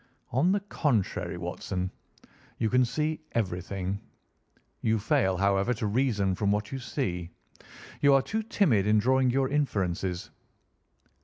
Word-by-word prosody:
"On 140 +9 +3
the 200 0 +1
contrary, 135 - -1
Watson, 90 +1 -3 0.7
you 110 -2 0
can 125 0 +5
see 155 +6 -1
everything. 95 -1 -2 0.8
You 110 0 +2
fail, 95 -3 +1
however, 100 +5 +2
to 110 0 -3
reason 105 -4 +1
from 100 +2 0
what 105 0 -1
you 135 - -3
see. 90 - -3 0.7
You 140 -1 +6
are 135 - +4
too 220 +7 -2
timid 145 - +2
in 105 0 +4
drawing 130 +4 +3
your 135 +2 +2
inferences." 95 -10 -1
110 Hz, 135 wpm, -28 LUFS, 95-135 Hz, 0.8 s, You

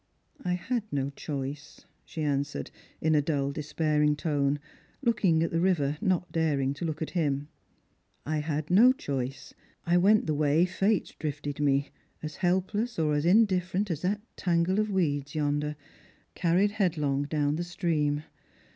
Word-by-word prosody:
" - - -44
I 180 - 0
had 235 +7 -1
no 140 -1 -1
choice," 140 0 -6 0.2
she 160 - -5
answered, 145 0 -2 0.3
in 160 0 +2
a 150 - +4
dull 140 -2 0
despairing 150 0 +1
tone, 145 -2 0 0.4
looking 190 -9 +3
at 165 - -1
the 165 - +1
river, 150 -6 +1
not 180 -3 0
daring 145 -4 +1
to 140 - -5
look 155 -1 -2
at - - -6
him. 145 -4 -1 0.4
" - - -43
I 155 +1 -1
had 150 +1 -3
no 235 +8 +7
choice. 135 - -4 0.3
I 175 +1 +3
went 205 +4 +4
the 155 - 0
way 150 +3 +3
Fate 195 +2 0
drifted 145 -1 -4
me, 140 -1 +1 0.3
as 155 -1 -5
helpless 190 +6 0
or 155 -2 +1
as 145 +2 +1
in 220 +6 +6
different 185 0 -1
as 155 -2 -3
that 205 +3 0
tangle 175 +2 +1
of 215 0 +1
weeds 145 -6 -1
yonder, 150 0 0 0.6
carried 180 +4 +2
headlong 155 -9 0
down 145 -1 0
the 175 - -1
stream. 160 -5 0
155 Hz, 165 wpm, -28 LUFS, 145-180 Hz, 0.6 s, no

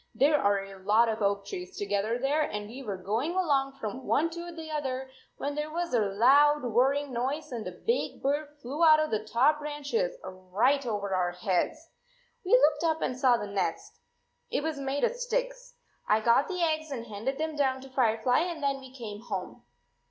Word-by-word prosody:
There 295 +2 +4
are 200 -1 +2
a 195 -1 -11
lot 215 +4 +4
of 220 0 -2
oak 200 0 +1
trees 180 -2 -7
together 205 +3 -1
there 275 +4 +1
and 210 -8 -3
we 245 +5 -9
were 205 -7 -4
going 220 - -1
along 280 -7 +1
19 - - -24
from 245 +5 -5
one 330 +3 +2
to 345 +1 -6
the 320 -2 -8
other, 265 -3 -3 0.3
when 285 - -3
there 300 +1 -3
was 340 -1 -3
a 240 - +4
loud 265 +9 +4
whirring 265 +4 +1
noise 270 +5 -2
and 230 -5 -4
a - - -4
big 455 - -2
bird 290 +2 0 0.2
flew 280 +7 -2
out 310 -1 +7
of 310 0 0
the 215 -1 0
top 260 +8 +3
branches 300 - -2
right 195 +10 0
over 205 -3 -2
our 180 -1 0
heads! 185 - -1 0.6
We 375 - 0
looked 340 -11 +5
up 320 -1 +1
and 255 - -1
saw 255 -1 +4
the 210 - -4
nest. 200 -1 -3 0.5
It - - -1
was 315 -2 -2
made 275 +1 -2
of 480 - +3
sticks. - - -3 0.3
I 215 - +5
got 235 +5 +3
the 365 -2 -2
eggs 315 -1 0
and 245 -5 -5
handed 230 +5 -4
them 315 0 -2
down 265 -2 +1
to 270 - -11
Firefly, 245 -1 +2
and 335 -2 -3
then 275 -1 0
we 260 -1 -12
came 220 -5 -8
home." 195 -6 -5
265 Hz, 205 wpm, -29 LUFS, 215-305 Hz, 0.6 s, out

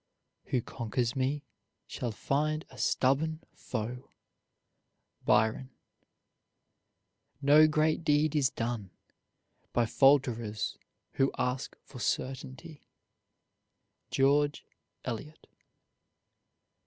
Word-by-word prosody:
Who 125 -3 0
conquers 115 0 -2
me, 135 +2 0 0.4
shall 125 - -4
find 155 +7 -1
a - - -14
stubborn 155 +5 +1
foe. 125 +2 -5 1.2
BYRON. 110 +4 +2 1.7
No 145 +2 +7
great 155 +2 +1
deed 150 0 +2
is 140 -4 +3
done 115 -4 -3 0.8
By 120 - +3
falterers 115 -5 +2 0.4
who 135 0 +3
ask 125 +1 -2
for 130 - -11
certainty. 135 +7 -4 1.2
GEORGE 145 +2 +2 0.4
ELIOT. 130 +6 -6
135 Hz, 80 wpm, -30 LUFS, 120-150 Hz, 1.7 s, No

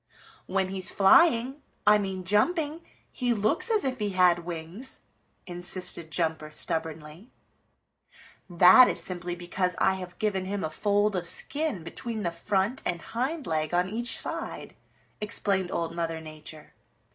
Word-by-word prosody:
"When 190 0 0
he's 190 -1 0
flying, 255 - +4 0.2
I 210 0 +6
mean 190 -2 -4
jumping, 300 - +1 0.3
he 245 -2 0
looks 290 - +1
as 435 -6 +2
if 260 -1 -2
he 205 -2 -2
had 180 -1 +5
wings," 175 +8 -7 0.4
insisted 175 -2 -2
Jumper 160 -2 -2
stubbornly. 160 +5 -3 1.2
"That 185 +8 +8
is - - 0
simply 175 -1 -2
because 180 0 -2
I 190 - +3
have 180 -1 -9
given 195 -3 -1
him 200 0 -3
a 155 - -3
fold 205 +3 +1
of 175 -2 -1
skin 290 - 0
between 220 +6 -5
the 170 - -1
front 195 +8 -1
and 170 - -2
hind 260 - -3
leg 155 +1 -1
on 180 +1 +2
each 235 +3 -4
side," - - -5 0.5
explained 195 -3 -1
Old 165 0 -2
Mother 165 -1 -2
Nature. 155 -1 -11
190 Hz, 145 wpm, -27 LUFS, 170-220 Hz, 1.2 s, That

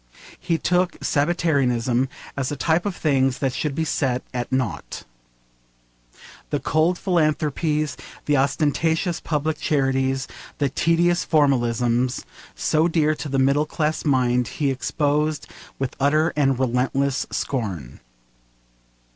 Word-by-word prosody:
He 170 -2 0
took 180 +3 +1
sabbatarianism 135 -6 +1 0.3
as 140 -1 -2
a - - -2
type 160 +7 +1
of 195 - -3
the - - -14
things 135 -3 +2
that 135 -2 -1
should 150 0 -2
be 160 - 0
set 130 -4 0
at 125 0 -3
nought. 130 -4 -2 1.5
The - - -1
cold 160 +3 +1
philanthropies, 155 -4 0 0.3
the 145 - +2
ostentatious 160 +5 +1
public 155 0 -2
charities, 135 -2 0 0.3
the 140 -2 +1
tedious 170 +4 +2
formalisms 125 -4 +1 0.3
so 155 +2 +2
dear 155 -2 +2
to 150 -1 -6
the 135 - -1
middle 140 +3 +3
class 155 0 -1
mind, 125 -4 +2
he 145 -3 +1
exposed 150 +3 0 0.3
with 135 -1 -3
utter 155 +4 +2
and 135 -3 +2
relentless 130 +2 0
scorn. 95 - -3
145 Hz, 120 wpm, -23 LUFS, 130-155 Hz, 1.5 s, middle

